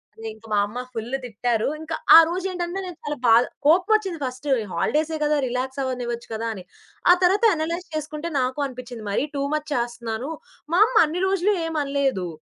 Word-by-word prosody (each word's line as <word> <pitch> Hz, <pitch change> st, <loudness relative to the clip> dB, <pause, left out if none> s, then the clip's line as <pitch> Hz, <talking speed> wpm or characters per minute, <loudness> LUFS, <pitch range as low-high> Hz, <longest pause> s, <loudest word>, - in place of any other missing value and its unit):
అదే 225 Hz, 0 st, -8 dB
ఇంక 220 Hz, +1 st, -18 dB
మా 210 Hz, -, +2 dB
అమ్మ 210 Hz, +4 st, -8 dB, 0.2 s
ఫుల్లు 235 Hz, +3 st, -3 dB
తిట్టారు. 230 Hz, 0 st, -1 dB
ఇంకా 320 Hz, 0 st, -4 dB, 0.2 s
ఆ -, -, +13 dB
రోజేంటంటే 360 Hz, 0 st, -3 dB
నేను 360 Hz, -3 st, -8 dB
చాలా 295 Hz, -1 st, -3 dB
బాధ 230 Hz, +1 st, +7 dB, 0.2 s
కోపమొచ్చింది 370 Hz, +2 st, +3 dB
ఫస్టు 260 Hz, +2 st, -2 dB, 0.2 s
హాలిడేసే 310 Hz, -, 0 dB
గదా! 300 Hz, 0 st, +2 dB
రిలాక్సవ్వనివ్వచ్చు 250 Hz, -1 st, -3 dB
కదా! 225 Hz, +1 st, -3 dB
అని 190 Hz, -4 st, -9 dB, 0.5 s
ఆ -, -, +10 dB
తర్వాత 385 Hz, +5 st, +3 dB
అనలైజ్ 335 Hz, +3 st, -3 dB
చేసుకుంటే, 310 Hz, +1 st, -4 dB
నాకు 255 Hz, +2 st, -2 dB
అనిపిచింది 245 Hz, -3 st, -9 dB
మరీ 260 Hz, -, +1 dB
టూ 275 Hz, -, -1 dB
మచ్ 305 Hz, 0 st, -2 dB
చేస్తన్నాను. 235 Hz, +2 st, -3 dB, 0.4 s
మా 355 Hz, -, +4 dB
అమ్మ -, -, -6 dB
అన్ని 340 Hz, +4 st, -3 dB
రోజులు 390 Hz, +2 st, +2 dB
ఏమనలేదు. 280 Hz, -, -1 dB
280 Hz, 165 wpm, -23 LUFS, 240-330 Hz, 0.5 s, ఆ